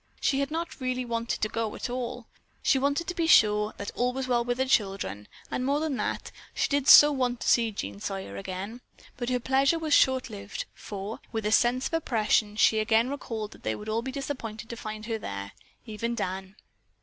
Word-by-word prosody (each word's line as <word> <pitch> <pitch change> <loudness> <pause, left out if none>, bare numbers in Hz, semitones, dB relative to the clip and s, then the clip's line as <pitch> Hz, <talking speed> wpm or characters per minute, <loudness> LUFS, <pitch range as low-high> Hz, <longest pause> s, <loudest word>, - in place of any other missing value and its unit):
She 270 - +1
had 280 0 0
not 325 -2 -4
really 255 0 -1
wanted 230 -2 -2
to - - +3
go 225 0 -3
at - - -4
all. 245 -1 -4 0.4
She 270 - +4
wanted 285 +4 +1
to 360 - -3
be 335 -2 0
sure 210 -7 +5
that 200 - -5
all 250 +1 0
was 265 0 -3
well 240 -1 +2
with 245 0 -1
the 260 - +1
children, 195 - 0 0.2
and 250 - -1
more 280 +3 +1
than 310 -3 -1
that, - - -3 0.2
she - - +1
did 280 -1 0
so 295 +1 +10
want 250 -3 0
to - - -3
see 230 -2 +4
Jean 100 - -5
Sawyer 100 0 -5
again. 190 - -6 0.4
But 240 0 -3
her 250 -1 +1
pleasure 270 +5 +2
was 315 -2 -1
short 260 -2 +4
lived, 200 -2 -6
for, 205 +2 -6
with 220 -2 -3
a 210 - +1
sense 245 +3 +3
of - - -3
oppression, 220 -8 +1
she 220 0 +4
again 225 +3 +3
recalled 225 -6 -5
that - - -15
they 110 - -1
would 210 - -8
all 220 +1 0
be 265 +2 -5
disappointed 245 -5 -5
to 235 - -5
find 215 -1 -6
her 225 -1 -2
there, 100 - -6 0.3
even 235 +1 -3
Dan. 190 -2 -4
235 Hz, 215 wpm, -28 LUFS, 210-265 Hz, 0.4 s, so